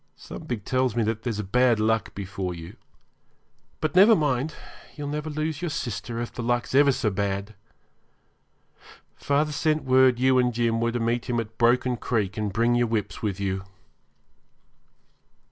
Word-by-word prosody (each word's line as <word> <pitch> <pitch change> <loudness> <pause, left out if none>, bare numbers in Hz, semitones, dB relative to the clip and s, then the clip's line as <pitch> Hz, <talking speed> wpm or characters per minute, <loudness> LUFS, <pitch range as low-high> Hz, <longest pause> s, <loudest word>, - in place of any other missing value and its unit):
Something 105 - -6
tells 130 +1 0
me 120 - +2
that 110 0 -1
there's 115 -4 -3
bad 120 +3 +3
luck 110 -1 0
before 95 -2 -4
you. 85 0 -10 1.1
But 155 0 -1
never 205 +5 +8
mind, 145 -2 0 0.4
you'll 145 -2 -5
never 150 +1 -3
lose 155 +1 -3
your 175 - -2
sister 120 -3 -4
if 120 - -5
the - - -5
luck's 120 +1 -1
ever 140 +1 +6
so 130 -5 0
bad. 100 +1 -2 1.6
Father 145 +2 0
sent 155 +1 0
word 130 -1 +4
you 130 +1 +3
and 125 -2 +1
Jim 115 -1 +1
were 115 0 +1
to 120 - -2
meet 115 +1 -1
him 120 -1 +1
at 115 -1 -7
Broken 125 +1 +3
Creek 105 -6 -1
and 105 -2 -2
bring 115 +4 +2
your 120 0 +2
whips 110 -3 -3
with 100 -3 -2
you.' 95 -1 -2
120 Hz, 160 wpm, -25 LUFS, 110-130 Hz, 1.6 s, never